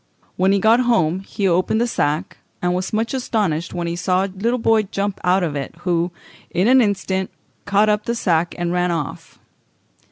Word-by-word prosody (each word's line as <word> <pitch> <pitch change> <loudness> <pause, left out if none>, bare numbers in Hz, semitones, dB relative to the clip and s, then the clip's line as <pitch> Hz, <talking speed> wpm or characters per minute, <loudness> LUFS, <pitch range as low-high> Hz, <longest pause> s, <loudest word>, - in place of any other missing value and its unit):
When 190 +1 +2
he 200 - +3
got 220 +4 +4
home 230 -9 +2
he 195 +1 -2
opened 185 +5 +2
the 240 - +2
sack, 160 -6 -1 0.2
and 180 0 0
was 185 +1 -2
much 225 +3 -1
astonished 205 -11 -1
when 175 -1 -2
he 170 0 -2
saw 185 +2 +1
a 195 - -8
little 230 +6 0
boy 225 -2 +3
jump 200 -1 -3
out 185 +1 +3
of 155 -4 -2
it, 140 +2 -5
who, 175 -1 0 0.4
in 185 +5 +1
an 260 +1 +6
instant, 190 -3 -1 0.4
caught 200 +1 +3
up 210 0 +1
the 235 - -1
sack 175 -6 0
and 175 0 -1
ran 180 0 +1
off. 165 -5 -4
190 Hz, 195 wpm, -20 LUFS, 175-215 Hz, 0.4 s, an